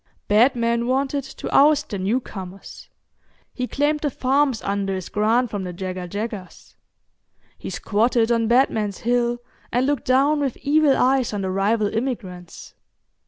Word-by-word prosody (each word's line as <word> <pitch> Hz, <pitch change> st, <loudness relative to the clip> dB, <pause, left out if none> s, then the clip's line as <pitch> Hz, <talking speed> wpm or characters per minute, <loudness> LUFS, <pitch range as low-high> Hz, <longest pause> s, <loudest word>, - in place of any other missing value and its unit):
Batman 235 Hz, +1 st, +2 dB
wanted 270 Hz, +2 st, 0 dB
to 270 Hz, -, -8 dB
oust 295 Hz, +1 st, +4 dB
the 200 Hz, -, -4 dB
newcomers; 195 Hz, -2 st, -5 dB, 0.6 s
he 250 Hz, -1 st, -3 dB
claimed 295 Hz, +3 st, 0 dB
the 295 Hz, -, -1 dB
farms 270 Hz, -2 st, 0 dB
under 195 Hz, -1 st, -1 dB
his 185 Hz, -2 st, -6 dB
grant 225 Hz, +3 st, +1 dB
from 205 Hz, -2 st, -3 dB
the 180 Hz, -, -5 dB
Jagga 185 Hz, 0 st, -5 dB
Jaggas. 205 Hz, -1 st, -7 dB, 0.8 s
He -, -, -8 dB
squatted 225 Hz, +2 st, +1 dB
on 230 Hz, -1 st, +2 dB
Batman's 220 Hz, -5 st, +1 dB
Hill, 240 Hz, 0 st, +1 dB, 0.3 s
and 245 Hz, +2 st, +1 dB
looked 285 Hz, 0 st, -1 dB
down 275 Hz, +4 st, +3 dB
with 275 Hz, -4 st, -2 dB
evil 285 Hz, 0 st, +3 dB
eyes 260 Hz, -2 st, +2 dB
on 200 Hz, -1 st, -3 dB
the 190 Hz, -, -2 dB
rival 205 Hz, +2 st, +1 dB
immigrants. 210 Hz, -8 st, -5 dB
235 Hz, 145 wpm, -22 LUFS, 200-265 Hz, 0.8 s, oust